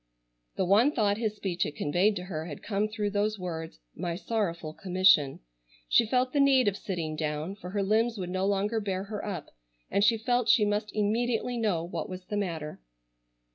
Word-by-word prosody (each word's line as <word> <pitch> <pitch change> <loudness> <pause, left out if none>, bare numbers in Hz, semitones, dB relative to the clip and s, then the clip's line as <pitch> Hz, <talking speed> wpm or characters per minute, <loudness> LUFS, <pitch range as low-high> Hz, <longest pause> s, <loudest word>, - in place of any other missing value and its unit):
The 190 - 0
one 215 +10 +5
thought 210 -5 +1
his 215 -2 -1
speech 180 -4 -4
had 150 - 0
conveyed 180 +8 +2
to 180 - -4
her 165 -3 -5
had 145 - -8
come 205 0 0
through 210 -1 -2
those 210 +1 0
words 165 -3 -5 0.2
"my 170 -1 -3
sorrowful 175 -6 -2
commission." 180 -7 +3 0.5
She 230 - +5
felt 255 +2 +1
the 290 - +2
need 270 -4 +5
of 200 - +2
sitting 170 -6 -4
down, 155 +4 -3
for 180 -3 -9
her 200 +1 -1
limbs 225 +3 +2
would 180 -2 -4
no 185 +1 0
longer 205 +3 +1
bear 195 -3 -2
her 205 +1 -6
up, 185 -7 -5 0.4
and 200 - +2
she 225 +2 +5
felt 245 +1 0
she 210 - +6
must 210 +1 -1
immediately 230 +3 0
know 210 -8 0
what 170 -2 -5
was 185 0 -7
the 210 - -4
matter. 165 - -4
200 Hz, 195 wpm, -29 LUFS, 175-215 Hz, 0.5 s, she